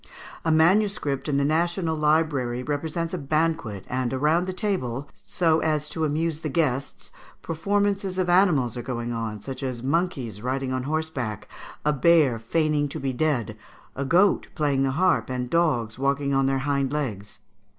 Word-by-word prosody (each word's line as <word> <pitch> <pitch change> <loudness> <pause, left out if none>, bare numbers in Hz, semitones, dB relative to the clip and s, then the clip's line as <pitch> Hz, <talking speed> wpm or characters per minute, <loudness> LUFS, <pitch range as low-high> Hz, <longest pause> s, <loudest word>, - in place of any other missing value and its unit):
A 160 - +1
manuscript 160 -4 +2
in 140 - +1
the 140 - +2
National 170 +2 0
Library 150 -5 +1
represents 160 +4 -3
a 180 - -2
banquet, 155 - -1
and 125 -1 -1
around 155 +7 +1
the - - -1
table, 145 - -2
so 165 -3 0
as 150 -1 0
to 160 +1 -3
amuse 155 +1 -1
the 155 - -4
guests, 135 -3 -1 0.3
performances 200 +3 0
of 185 -1 +1
animals 175 - +3
are 120 - -4
going 120 -1 -4
on, 110 -3 -4
such 135 +2 -7
as 125 -3 -4
monkeys 135 - -1
riding 130 +1 -2
on 130 - -1
horseback, 150 -9 -3 0.4
a 150 - +3
bear 145 -4 +4
feigning 150 +4 0
to 155 - -5
be 135 -2 -2
dead, 130 -5 0 0.4
a 140 - -2
goat 180 +8 +3
playing 145 -4 +1
the 135 - +2
harp, 185 -5 +2
and 125 -1 -3
dogs 130 -10 +1
walking 140 +1 0
on 135 0 +3
their 135 0 +1
hind 140 -2 0
legs." 110 -9 -4
145 Hz, 165 wpm, -25 LUFS, 130-165 Hz, 0.4 s, bear